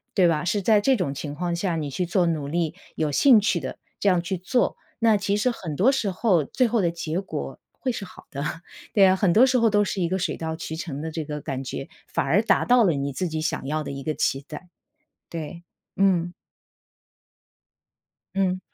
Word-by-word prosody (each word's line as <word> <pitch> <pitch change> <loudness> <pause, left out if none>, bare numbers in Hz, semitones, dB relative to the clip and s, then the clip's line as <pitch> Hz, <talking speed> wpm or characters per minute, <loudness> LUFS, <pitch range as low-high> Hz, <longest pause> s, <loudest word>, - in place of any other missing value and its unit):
对 185 -3 +5
吧？ 155 -3 +1
是 205 +3 0
在 210 +1 +4
这 265 +5 +3
种 155 -8 -1
情 145 +1 -5
况 175 +1 -2
下 175 0 -1
你 150 -2 -3
去 180 +6 -1
做 175 +1 +2
努 155 -4 -1
力， 165 0 -1 0.2
有 155 -2 0
兴 245 - +6
趣 200 -4 +1
的， 130 - -6 0.2
这 200 - +3
样 180 - +3
去 185 +2 -3
做， 220 +8 0 0.2
那 225 -2 +4
其 200 0 0
实 250 +4 +2
很 170 -10 -6
多 220 - +4
时 230 -7 0
候 185 -4 +2
最 250 - +1
后 230 -1 +1
的 175 - +2
结 165 +1 -3
果 195 - -6 0.2
会 260 - -1
是 215 - -5
好 190 - -12
的。 140 +1 -4 0.5
对 200 -2 +6
啊， 190 0 +5
很 190 -2 +2
多 225 +8 +7
时 260 -1 +2
候 230 - +4
都 205 -1 +3
是 190 - -2
一 170 - +1
个 190 - 0
水 185 - -1
到 160 -1 -4
渠 160 0 -6
成 155 -4 -5
的 160 - -4
这 160 0 -3
个 150 0 -5
感 135 -2 -4
觉， 135 +1 -5 0.2
反 - - -1
而 165 +10 +3
达 225 - +2
到 245 -1 +5
了 180 - +3
你 140 -1 -2
自 180 +7 -2
己 160 0 -3
想 155 - -2
要 155 +1 -1
的 - - -5
一 135 0 -6
个 155 - -1
期 135 +1 0
待。 180 - -9 0.6
对， 165 +1 -6 0.3
嗯。 180 -3 +2 2.0
嗯。 185 -1 +1
175 Hz, 240 characters per minute, -24 LUFS, 155-205 Hz, 2.0 s, 多